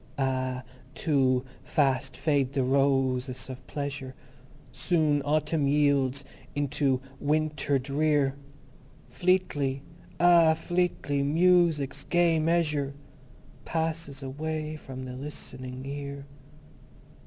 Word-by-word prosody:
Ah, 130 -1 -1 0.3
too 130 -4 +2 0.2
Fast 135 -2 0
Fade 140 -2 +1
the 135 -2 +1
Ro 135 0 +3
o - - -1
ses 130 -1 -6
of 130 0 -11
Pleasure; 140 -2 -5 0.6
Soon 155 -5 +1
Autumn 150 0 +1
yields 140 -2 +2 0.3
unto 140 -2 +1 0.2
Wi 150 +2 +2
i - - -3
nter 145 -2 0
Drear. 140 +1 +1 0.8
Fleetly! 150 -7 0 0.4
Ah, 170 -2 +6
Fleetly 165 -4 -1
Mu 175 +5 +5
u - - 0
sic's 145 -1 -5
Gay 175 -2 +3
Measure 155 -4 +1 0.7
Passes 160 -3 -3
away 155 +3 -4
from 130 -3 -8
the 130 -1 -6
Listening 130 -1 -7
Ear. 140 0 -6
140 Hz, 110 wpm, -28 LUFS, 135-155 Hz, 0.8 s, Ah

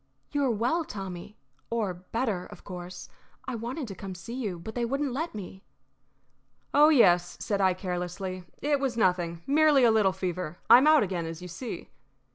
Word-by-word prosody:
"You 290 -1 0
are - - +2
well, 245 +9 +1
Tommy 195 - -7 0.3
or 220 -5 -1
better, 185 +2 -3
of - - -13
course. 180 -1 -8 0.4
I 260 - -3
wanted 245 +5 -4
to 200 - -6
come 190 +1 -7
to 180 - -11
see 230 +7 -8
you, 215 -8 -3
but 195 +6 -8
they 240 - -2
wouldn't 275 +2 -1
let 320 +3 -3
me." 190 -1 -8 1.1
"Oh 295 +2 +7
yes," 175 - +4
said 200 -2 -1
I, 185 -1 +3
carelessly, 185 0 -4 0.2
"it 290 -1 +2
was 265 -4 -1
nothing. 175 -5 +1
Merely 295 -2 +5
a 235 - +6
little 215 -3 +4
fever. 180 -3 -4
I 245 - +11
am 280 - +3
out 310 -4 +6
again, 175 -4 -2
as 165 0 -6
you - - -6
see." 185 +8 -7
205 Hz, 190 wpm, -28 LUFS, 180-255 Hz, 1.1 s, I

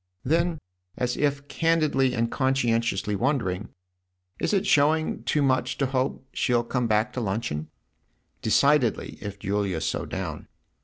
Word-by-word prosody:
Then, 165 +4 +1 0.4
as 125 -1 0
if 145 -1 0
candidly 155 -6 +2
and 115 0 0
conscientiously 115 -6 +1
wondering: 110 -6 -1 0.4
" 90 +1 -46
Is - - +1
it 200 -1 +1
showing 155 -3 +3
it - - -18
too 150 - +2
much 130 -2 +1
to 140 - +1
hope 130 0 -1
she'll 120 -2 +1
come 125 0 -1
back 110 +3 +1
to 125 - -3
luncheon? 95 -8 -2 0.4
" - - -45
"Decidedly 140 -6 +2
if 100 -1 -6
Julia's 100 -4 -1
so - - -2
down." - - -5
125 Hz, 150 wpm, -26 LUFS, 105-145 Hz, 0.4 s, showing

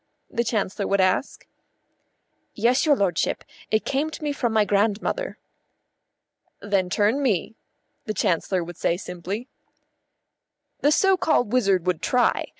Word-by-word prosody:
the 235 - 0
Chancellor 205 -3 -1
would 200 - +1
ask. 185 +8 0 1.1
"Yes, 245 +7 +2
your 290 - +6
lordship. 190 -8 0 0.3
It 215 0 +1
came 285 +3 0
to 315 - -9
me 295 - 0
from 245 -4 -1
my 215 -1 +3
grandmother." 210 - 0 1.2
"Then 200 -3 0
turn 210 +9 +1
me," 220 - 0 0.5
the 215 - -2
Chancellor 180 0 0
would 175 0 -9
say 170 - 0
simply. 190 +6 -6 1.3
The 290 - +3
so 385 +4 +4
called 245 - +1
wizard 195 -8 +2
would 180 -3 0
try. 250 -1 +2
210 Hz, 135 wpm, -24 LUFS, 185-255 Hz, 1.3 s, your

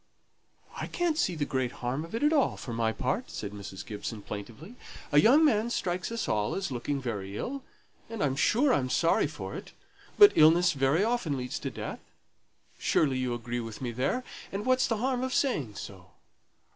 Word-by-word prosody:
"I - - -4
can't 345 -3 0
see 185 - 0
the 150 -2 -1
great 130 -3 -1
harm 125 +5 -3
of 165 +6 -7
it 295 +7 +2
all, 285 -4 +2
for 120 - -6
my 115 -1 +1
part," 130 - -2
said 100 - -5
Mrs. 100 -2 -8
Gibson, 105 0 -6
plaintively. 115 - -8 0.4
"A 145 - +6
young 275 - +6
man 225 -5 +2
strikes 180 -4 -2
us 230 -1 -2
all 105 -1 0
as 195 -6 -3
looking 130 +3 -2
very 100 -6 -4
ill 275 +2 -4 0.5
and 225 -5 -3
I'm 135 -2 +1
sure 250 - +3
I'm 130 -2 +1
sorry 165 +5 +3
for - - -7
it; - - -8 0.4
but 410 0 +10
illness 170 +3 +6
very 140 +6 +2
often 220 - 0
leads 125 0 -4
to - - -3
death. - - -6 0.8
Surely 135 -4 +2
you 125 -2 -1
agree 120 +1 -4
with 115 -2 -6
me 125 -3 -3
there, 140 - -1 0.3
and 200 +3 -4
what's 255 0 +3
the 225 - 0
harm 250 +2 0
of 260 0 -2
saying 145 - 0
so? 95 -1 -9
145 Hz, 190 wpm, -29 LUFS, -, 0.8 s, but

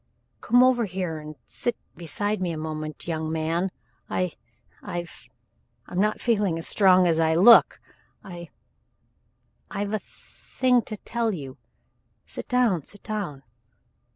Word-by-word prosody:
"Come 245 +1 +4
over 250 -2 +3
here 180 -4 -4
and 155 0 -9
sit 240 -1 -3 0.2
beside 205 +5 -3
me 180 -2 -1
a 160 - -4
moment, 155 0 -5
young 160 -1 -2
man 165 +3 0 0.4
I 180 -2 -1 0.5
I've 175 0 -7 0.6
I'm 180 - -4
not 215 +2 +1
feeling 205 -8 +1
as 165 - -3
strong 185 -3 +5
as 165 -2 +2
I 160 0 +3
look. 225 +7 +7 0.4
I 175 -3 -9 1.2
I've 200 +1 -3
a 215 - +1
thing 250 +5 -1
to 215 - -5
tell 230 -1 -2
you. 135 -5 -9 0.7
Sit - - -8
down 245 -9 +2
sit 205 - -10
down. 195 -11 -4
180 Hz, 135 wpm, -25 LUFS, 160-215 Hz, 1.2 s, look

